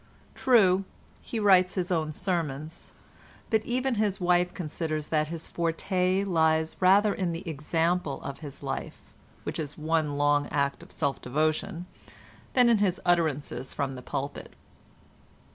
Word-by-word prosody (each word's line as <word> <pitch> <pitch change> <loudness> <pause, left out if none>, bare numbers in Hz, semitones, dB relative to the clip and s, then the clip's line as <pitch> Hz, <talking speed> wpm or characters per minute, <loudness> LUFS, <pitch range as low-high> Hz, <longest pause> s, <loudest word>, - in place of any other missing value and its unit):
True, 195 -7 +4 0.4
he 230 - -4
writes 190 -3 +5
his 185 -1 -1
own 160 -3 0
sermons, 160 -2 -4 0.6
but 220 -1 +3
even 255 +2 0
his 205 -3 0
wife 180 0 +2
considers 155 -2 -4
that 155 -1 +1
his 165 0 -6
forte 180 +3 0
lies 160 -4 +2
rather 200 +3 +5
in 180 -3 -1
the 170 +3 -6
example 165 0 -1
of 140 - -6
his 145 -4 -9
life - - -5 0.4
(which - - -4
is 150 -2 -5
one 155 -2 0
long 145 0 +2
act 140 -1 -1
of - - -14
self 140 -3 -2
devotion) 155 +7 -1 0.7
than 250 -2 +5
in 230 -3 +4
his 190 -3 +1
utterances 155 -6 0
from 140 -1 -1
the 125 - -8
pulpit. 140 +2 -5
165 Hz, 145 wpm, -28 LUFS, 150-185 Hz, 0.7 s, writes